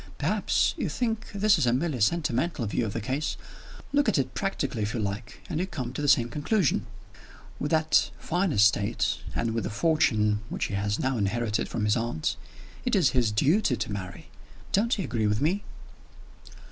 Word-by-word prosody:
Perhaps - - +1
you - - -1
think 225 -3 -2
this 200 -5 +3
a 120 - +3
merely 135 -1 -1
sentimental 140 +1 +1
view 110 +2 -1
of 100 - -5
the 115 - -2
case? 135 +8 -2 0.6
Look 285 0 +3
at - - +1
it 130 -2 -1
practically, 195 - -2
if 105 +3 -2
you - - -1
like, 105 +2 -4
and 160 -3 -2
you 185 - -1
come 130 -9 -5
to 145 - -4
the 145 - 0
same 120 -4 +5
conclusion. 150 - 0 0.7
With 145 - -2
that 160 0 +3
fine 180 +2 0
estate 105 -1 +2 0.2
and 115 -1 0
with 115 - -1
the - - -2
fortune 110 -5 +2
which - - -2
he - - -5
has 100 +1 0
now 130 -2 0
inherited 105 +1 -1
from 105 - -1
his 105 - +3
aunt 115 -9 -1 0.5
it 250 -2 +1
is 180 -8 +4
his 120 -5 +2
duty 145 - +2
to 110 - -4
marry. 95 -2 -6 0.4
Don't 225 +4 +2
you 195 - -2
agree 115 -7 0
with 105 0 +1
me?" 180 +8 +1
125 Hz, 185 wpm, -27 LUFS, 110-170 Hz, 0.7 s, same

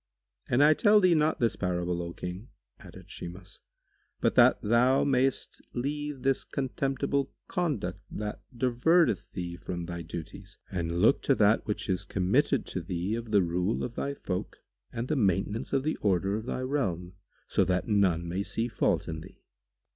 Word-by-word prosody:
"And 130 +4 +4
I 150 +1 +7
tell 210 +5 +5
thee 185 -3 +5
not 155 0 +2
this 115 -3 +2
parable, 90 -1 -1
O 85 0 -5
King," 90 +6 -7 0.3
added - - -13
Shimas, 90 +2 -9 0.6
"but - - +2
that - - +6
thou 120 +5 +4
mayest 135 -1 0
leave 145 +1 -3
this 135 -1 +2
contemptible 135 +1 -1 0.2
conduct 145 - -2
that 105 0 -5
diverteth 125 - +2
thee 85 -2 -5
from 85 -1 -5
thy 85 0 -5
duties 80 -1 -8
and 85 -1 -2
look 125 - +5
to 135 - +2
that 105 0 +3
which 105 - -2
is 95 0 0
committed 100 +9 +1
to 90 - -4
thee 90 +3 -3
of 115 0 -4
the 100 -3 +4
rule 90 +5 -1
of 120 - -4
thy 140 +3 -3
folk 90 -8 -5 0.3
and 115 +1 -4
the 155 - 0
maintenance 100 -1 0
of 135 -1 +1
the 155 - -1
order 95 0 +1
of 110 +2 -5
thy 130 - -2
realm, 95 - -2 0.3
so - - +2
that 90 -1 0
none 95 -6 +2
may 90 +3 -2
see 115 +3 -2
fault 120 - 0
in 80 0 -5
thee." - - -15
105 Hz, 170 wpm, -29 LUFS, 90-135 Hz, 0.6 s, I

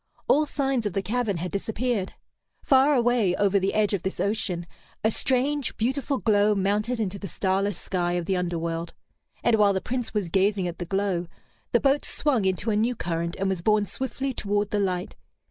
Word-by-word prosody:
All 300 +1 +4
signs 270 -6 0
of 200 - -5
the 195 - -1
cavern 220 -1 -1
had 175 +2 -4
disappeared. 220 0 -2 0.5
Far 275 +2 +5
away, 235 -7 +2
over 200 -1 +3
the 195 +1 -1
edge 210 -1 +2
of 195 - 0
this 190 - -4
ocean, 195 -4 -1 0.4
a 220 - +3
strange, 265 +3 0
beautiful 265 +4 0
glow 210 -2 +3
mounted 210 +5 0
into 200 -2 -2
the 200 - -6
starless 190 +1 0
sky 175 -2 -1
of 175 -1 -1
the 190 - 0
underworld. 170 -2 -3 0.5
And 235 -2 +4
while 205 -2 +4
the 190 - 0
Prince 245 +3 -3
was 210 -4 -1
gazing 195 +1 +2
at 175 - -6
the 175 - -3
glow, 195 -2 -1 0.4
the - - +4
boat 275 +1 +2
swung 260 -9 +1
into 190 +4 0
a - - +1
new 230 +4 +1
current, 170 -2 -2
and 195 0 -1
was 190 -3 -1
borne 210 +2 +3
swiftly 265 +3 -3
toward 205 -2 -1
the 210 - +1
light. 185 -1 -2
205 Hz, 195 wpm, -26 LUFS, 185-240 Hz, 0.5 s, Far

